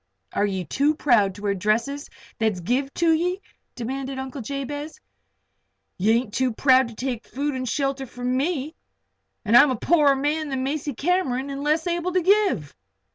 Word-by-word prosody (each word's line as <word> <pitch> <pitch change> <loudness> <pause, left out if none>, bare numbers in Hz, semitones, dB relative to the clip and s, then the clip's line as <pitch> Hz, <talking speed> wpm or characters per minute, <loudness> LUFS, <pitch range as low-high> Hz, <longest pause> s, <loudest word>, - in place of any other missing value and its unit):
"Are 205 - +1
ye 190 -2 -3
too 285 - +1
proud 215 -10 +3
to 205 - -11
wear 200 -1 +1
dresses 225 +9 -1 0.3
that's 220 -4 +1
give 255 +10 -1
to 335 -1 +3
ye?" 360 +4 0 0.4
demanded 265 +3 -4
Uncle 265 +1 -5
Jabez. 285 +4 -5 1.0
"Ye 210 +4 +3
ain't 230 -2 0
too 260 -2 +1
proud 260 +1 +4
to 235 - -11
take 245 -1 -4
food 285 +2 -2
and 255 -2 -3
shelter 275 0 -1
from 245 +1 -3
me. 295 +1 -1 0.7
And 215 +3 +3
I'm 275 +4 +8
a 260 - 0
poorer 290 +2 +3
man 295 +3 -1
than 265 -1 -2
Macy 290 0 -3
Cameron 280 -4 0
an' 275 0 -5
less 305 +2 +1
able 345 +1 -1
to 365 - +2
give." 385 - +2
270 Hz, 175 wpm, -24 LUFS, 240-295 Hz, 1.0 s, I'm